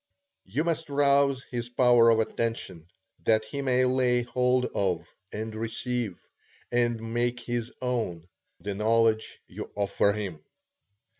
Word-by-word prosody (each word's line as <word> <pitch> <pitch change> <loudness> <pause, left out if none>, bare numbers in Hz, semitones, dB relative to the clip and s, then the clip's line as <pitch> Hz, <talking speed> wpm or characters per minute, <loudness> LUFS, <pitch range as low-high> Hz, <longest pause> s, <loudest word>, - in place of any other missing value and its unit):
You 130 +11 -1
must 165 -2 -2
rouse 140 -2 +3
his 120 -1 -3
power 120 -1 +5
of 115 -1 +4
attention, 110 -7 -2 0.4
that 110 -1 +3
he 140 +6 -4
may 130 -1 +2
lay 125 -1 +2
hold 125 +1 +1
of, 90 -4 0 0.2
and 110 +1 -5
receive, 115 -1 -3 0.5
and 120 -2 0
make 120 +1 0
his 120 0 -3
own, 110 -10 -2 0.3
the 100 - -4
knowledge 110 +1 +1
you - - -7
offer 100 0 +2
him. 95 -8 -5
120 Hz, 130 wpm, -27 LUFS, 110-125 Hz, 0.5 s, power